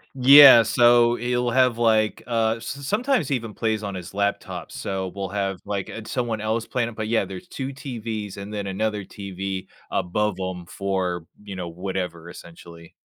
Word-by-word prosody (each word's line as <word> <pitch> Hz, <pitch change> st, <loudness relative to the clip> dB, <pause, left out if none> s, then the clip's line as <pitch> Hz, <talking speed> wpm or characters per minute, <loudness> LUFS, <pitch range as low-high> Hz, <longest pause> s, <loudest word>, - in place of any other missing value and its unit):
Yeah, 135 Hz, -2 st, +9 dB
so, 120 Hz, +1 st, +4 dB
he'll 125 Hz, 0 st, -1 dB
have, 125 Hz, -2 st, +3 dB
like, 110 Hz, -2 st, +2 dB
uh, 115 Hz, -2 st, +1 dB
s 115 Hz, -, -11 dB
sometimes 210 Hz, -, -1 dB
he 140 Hz, -, +1 dB
even 115 Hz, -3 st, -5 dB
plays 110 Hz, -2 st, -1 dB
on 100 Hz, -1 st, -4 dB
his 90 Hz, 0 st, -8 dB
laptop. 100 Hz, 0 st, -2 dB
So, 95 Hz, -1 st, -4 dB
we'll 100 Hz, -1 st, -4 dB
have, 95 Hz, -2 st, -2 dB
like, 100 Hz, -2 st, -3 dB
uh, 110 Hz, -, -7 dB
someone 115 Hz, -4 st, -2 dB
else 110 Hz, +1 st, -1 dB
playing 120 Hz, -2 st, -1 dB
it, 115 Hz, -, -12 dB
but, 110 Hz, -1 st, -4 dB
yeah, 115 Hz, -3 st, +1 dB
there's 95 Hz, -1 st, -9 dB
2 135 Hz, -1 st, -5 dB
TVs, 110 Hz, -7 st, -6 dB
and 100 Hz, +1 st, -7 dB
then 100 Hz, -1 st, -4 dB
another 105 Hz, +1 st, -2 dB
TV 95 Hz, -1 st, -6 dB, 0.2 s
above 105 Hz, +3 st, 0 dB
'em 95 Hz, -2 st, -4 dB
for, 95 Hz, -3 st, -3 dB, 0.2 s
you 100 Hz, -2 st, -8 dB
know, 90 Hz, -2 st, -5 dB
whatever, 90 Hz, -1 st, -5 dB
essentially. 85 Hz, -1 st, -13 dB
105 Hz, 180 wpm, -23 LUFS, 95-120 Hz, 0.2 s, Yeah